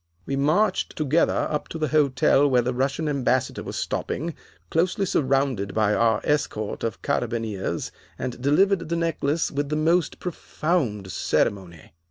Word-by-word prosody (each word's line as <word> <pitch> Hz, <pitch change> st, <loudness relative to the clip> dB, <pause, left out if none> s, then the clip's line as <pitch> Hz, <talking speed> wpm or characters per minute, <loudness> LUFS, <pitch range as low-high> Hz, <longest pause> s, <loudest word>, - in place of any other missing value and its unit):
We 135 Hz, -, -2 dB
marched 155 Hz, +10 st, +1 dB
together 155 Hz, +2 st, +2 dB
up 150 Hz, -, -2 dB
to -, -, -6 dB
the 155 Hz, -1 st, -1 dB
hotel 145 Hz, -1 st, +3 dB
where 125 Hz, -2 st, +3 dB
the 125 Hz, +2 st, -1 dB
Russian 135 Hz, +5 st, -1 dB
Ambassador 130 Hz, -3 st, 0 dB
was -, -, -6 dB
stopping, 165 Hz, +4 st, -3 dB, 0.4 s
closely 185 Hz, +5 st, +1 dB
surrounded 135 Hz, -, 0 dB
by 105 Hz, -1 st, +3 dB
our 115 Hz, -1 st, +2 dB
escort 110 Hz, -8 st, -1 dB
of 115 Hz, -, -3 dB
carabineers, 115 Hz, -5 st, -2 dB, 0.3 s
and 125 Hz, -1 st, -5 dB
delivered 170 Hz, +5 st, +2 dB
the 170 Hz, -, 0 dB
necklace 165 Hz, -2 st, 0 dB
with 145 Hz, 0 st, -2 dB
the 150 Hz, -, 0 dB
most 165 Hz, +1 st, +1 dB
profound 150 Hz, -, -2 dB
ceremony. 90 Hz, -5 st, -1 dB
140 Hz, 145 wpm, -24 LUFS, 120-160 Hz, 0.4 s, hotel